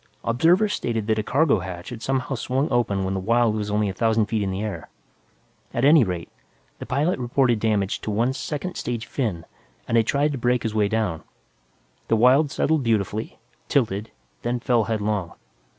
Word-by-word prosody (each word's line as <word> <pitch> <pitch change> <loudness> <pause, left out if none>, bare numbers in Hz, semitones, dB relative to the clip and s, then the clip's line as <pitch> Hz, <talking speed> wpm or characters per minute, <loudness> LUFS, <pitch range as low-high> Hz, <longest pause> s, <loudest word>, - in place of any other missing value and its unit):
Observers 175 - +3
stated 115 - -2
that 110 0 +1
a - - -1
cargo 140 -1 +2
hatch 90 -1 -7
had 120 -2 -8
somehow 135 +1 -1
swung 130 +4 -1
open 105 -6 +1
when 95 0 -1
the 95 - -1
Wyld 115 +2 +2
was 105 -1 -3
only 105 0 +1
a 95 - -2
thousand 110 +1 +2
feet 110 0 -1
in 100 - -1
the 95 +2 -3
air. 105 -2 -5 0.9
At 120 - +2
any 150 -1 +7
rate, 90 -5 -4 0.5
the - - -7
pilot 150 +3 0
reported 120 -1 +1
damage 105 -3 0
to - - -5
one 115 +5 +1
second 150 +6 -4
stage 120 -2 -3
fin 100 - -3 0.4
and 115 -1 +3
tried 145 +2 +2
to 135 - -4
brake 125 0 +1
his 110 - -2
way 105 -2 +2
down. 105 -7 -1 0.9
The 115 - +2
Wyld 130 +6 +5
settled 155 +2 +1
beautifully, 110 -3 -1 0.3
tilted, 110 -5 0 0.3
then 120 +1 -1
fell 120 -3 +2
headlong. 105 -5 -2
115 Hz, 180 wpm, -23 LUFS, 105-130 Hz, 0.9 s, any